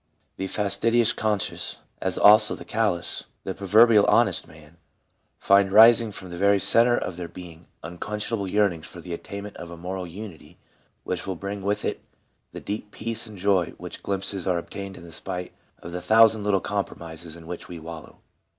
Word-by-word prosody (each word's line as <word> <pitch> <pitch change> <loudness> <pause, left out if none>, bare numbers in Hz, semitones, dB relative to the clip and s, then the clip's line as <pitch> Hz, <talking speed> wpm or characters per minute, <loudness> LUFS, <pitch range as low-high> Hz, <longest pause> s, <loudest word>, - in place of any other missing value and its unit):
The 95 - -3
fastidious 110 +4 +2
conscience, 105 -2 -2 0.2
as - - -1
also 105 +1 +6
the - - -11
callous, 105 -6 -1 0.2
pro 95 - -3
verbially 105 +3 +5
honest 110 -7 +2
man, 80 +1 -17 0.6
find 100 0 +3
rising 115 +1 +7
from 95 -3 -9
the 85 - -7
very 100 0 +4
centre 120 +4 +4
of 90 - -4
their 90 -1 -5
being 85 -1 -12 0.2
unquenchable 105 +4 -4
yearnings 95 -5 0
for 85 - -10
the 85 0 -7
attainment 100 +4 -7
of 85 - -9
a 85 - -9
moral 90 +1 -5
unity 95 -1 -10 0.5
which 90 0 -4
will 95 - -2
bring 100 +3 -6
with 100 +2 -1
it - - -3 0.5
the - - -8
deep 105 +1 -5
peace 115 +1 -4
and 105 -2 -11
joy 95 -2 +2
of - - -13
which - - -7
glimpses 95 -1 -2
are 90 -2 +2
obtained 95 +3 -7
in 85 0 -12
spite 90 +2 -4 0.3
of 85 - -8
the 90 +1 -5
thousand 110 +1 +5
little 100 -2 +1
compromises 80 -1 -5
in 85 -1 -13
which 85 +1 -7
we 90 - -8
wallow. 80 0 -10
95 Hz, 180 wpm, -25 LUFS, 85-105 Hz, 0.6 s, rising